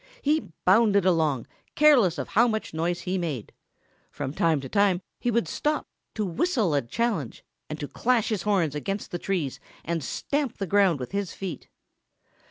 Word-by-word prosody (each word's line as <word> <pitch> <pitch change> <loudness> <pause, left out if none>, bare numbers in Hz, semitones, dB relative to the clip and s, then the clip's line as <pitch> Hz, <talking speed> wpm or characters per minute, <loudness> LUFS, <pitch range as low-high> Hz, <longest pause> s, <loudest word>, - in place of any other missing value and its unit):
He 300 - +1
bounded 200 0 +5
along, 160 -9 +2 0.3
careless 250 - +5
of 140 - -4
how 235 +3 +4
much 220 -6 -2
noise 170 +2 -1
he 185 +1 -2
made. 150 -11 -4 0.6
From 140 -1 -5
time 160 -2 +2
to 135 - -6
time 200 +1 +3 0.2
he 245 - -1
would 235 0 +1
stop 300 0 -1 0.3
to 215 - -1
whistle 220 - +1
a 140 - +3
challenge 170 - -2 0.2
and 155 0 -5
to 145 - -4
clash 235 - +1
his 215 -5 -1
horns 185 -7 +1
against 195 +7 -4
the 175 - -3
trees 170 -10 -2 0.3
and 165 -1 -2
stamp 280 - -2
the 195 - -2
ground 190 -4 +3
with 125 - -6
his 200 -2 -2
feet. 185 -7 -6
190 Hz, 175 wpm, -26 LUFS, 160-220 Hz, 0.6 s, bounded